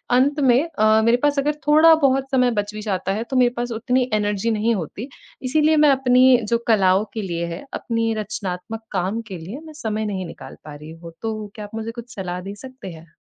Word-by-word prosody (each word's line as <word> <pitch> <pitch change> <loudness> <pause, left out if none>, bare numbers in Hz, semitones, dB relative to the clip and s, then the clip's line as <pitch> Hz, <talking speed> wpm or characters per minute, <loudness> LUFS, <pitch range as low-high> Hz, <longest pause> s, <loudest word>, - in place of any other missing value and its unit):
अंत 280 +4 +2
में 260 +1 +4 0.2
अ, 215 0 +5
मेरे 235 +1 +4
पास 290 -1 +2
अगर 295 +2 0
थोड़ा 315 +2 +7
बहुत 270 0 +1
समय 250 -2 +3
बच 205 +1 -9
भी 215 - -5
जाता 195 -2 -2
है 220 - -2
तो 265 - -1
मेरे 245 -1 +4
पास 240 0 -2
उतनी 250 +3 0
एनर्जी 210 +1 0
नहीं 225 +1 +1
होती, 200 - -6 0.3
इसीलिए 305 +4 +2
मैं 300 -1 +6
अपनी 255 -1 +5
जो 235 - +3
कलाओं 195 -2 +3
के 220 - -3
लिए 170 -3 -3
है, 185 - -10
अपनी 230 -1 -1
रचनात्मक 215 0 -5
काम 195 +4 -1
के 185 - -5
लिए 185 - -8
मैं 315 - -11
समय 220 -7 -3
नहीं 190 -3 -3
निकाल - - -11
पा 150 -1 -9
रही 150 +2 -11
हूँ। 165 +1 -11
तो 215 -2 -4
क्या 210 - -7
आप 205 +2 -11
मुझे 225 +1 -4
कुछ 235 +1 -10
सलाह 180 -2 -4
दे 200 +2 -7
सकते 260 -8 -9
हैं? 160 -1 -14
225 Hz, 220 wpm, -21 LUFS, 195-255 Hz, 0.3 s, थोड़ा